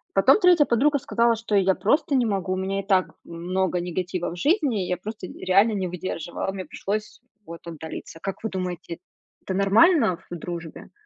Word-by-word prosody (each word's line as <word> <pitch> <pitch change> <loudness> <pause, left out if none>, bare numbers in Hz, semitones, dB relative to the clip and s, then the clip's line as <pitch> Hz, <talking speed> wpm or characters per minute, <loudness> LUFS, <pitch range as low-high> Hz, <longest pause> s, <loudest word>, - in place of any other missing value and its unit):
Потом 200 - +5
3 355 -5 +6
подруга 285 +4 +2
сказала: 235 -1 +2 0.2
"Я 195 -2 +4
просто 280 - +1
не 250 -2 +3
могу, 195 -3 -1
у - - 0
меня 195 +1 -2
и - - -14
так 190 -2 +2
много 180 +2 -2
негатива 175 0 -3
в - - -7
жизни, 285 - +1
я 180 - -1
просто 210 +1 -7
реально 195 +6 +2
не 190 -3 -1
выдерживала, 175 0 -4
мне 190 -1 -6
пришлось 210 +4 -4 0.2
вот 170 0 -10
отдалиться". 165 0 -8
Как 195 +1 -5
вы 220 - -1
думаете, 180 -2 -5 0.4
это 190 - -4
нормально 200 - +4
в 175 - -5
дружбе? 170 -1 -7
190 Hz, 175 wpm, -24 LUFS, 180-220 Hz, 0.4 s, 3